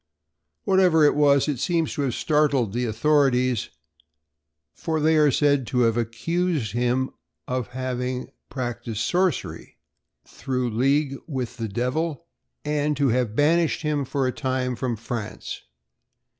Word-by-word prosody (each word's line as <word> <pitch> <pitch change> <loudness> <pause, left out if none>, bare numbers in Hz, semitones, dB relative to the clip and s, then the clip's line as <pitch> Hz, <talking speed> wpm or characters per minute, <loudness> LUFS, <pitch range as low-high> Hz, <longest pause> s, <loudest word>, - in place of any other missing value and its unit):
Whatever 185 -5 +4
it 145 - +5
was, 140 -1 +4
it 145 -5 -1
seems 165 +3 0
to - - -3
have 130 -4 -1
startled 145 -8 +1
the 125 +1 -1
authorities, 125 0 +2 1.0
for 160 -1 -2
they 160 +1 +3
are 150 -1 +5
said 140 -2 +2
to 125 -2 +1
have 115 -2 +3
accused 130 - -1
him 125 +3 0 0.4
of 125 -3 -2
having 125 0 -4 0.2
practiced 120 -4 -4
sorcery 180 -4 -1 0.5
through 125 -2 -3
league 135 +4 +1
with 130 -7 -4
the 115 -2 -3
devil, 130 +8 -2 0.4
and 150 -1 0
to 140 -1 +2
have 120 -2 0
banished 165 +4 +2
him 150 -2 0
for 135 0 -1
a 130 - +1
time 130 -1 -2
from 120 0 -2
France. 115 -1 -6
130 Hz, 135 wpm, -24 LUFS, 120-150 Hz, 1.0 s, it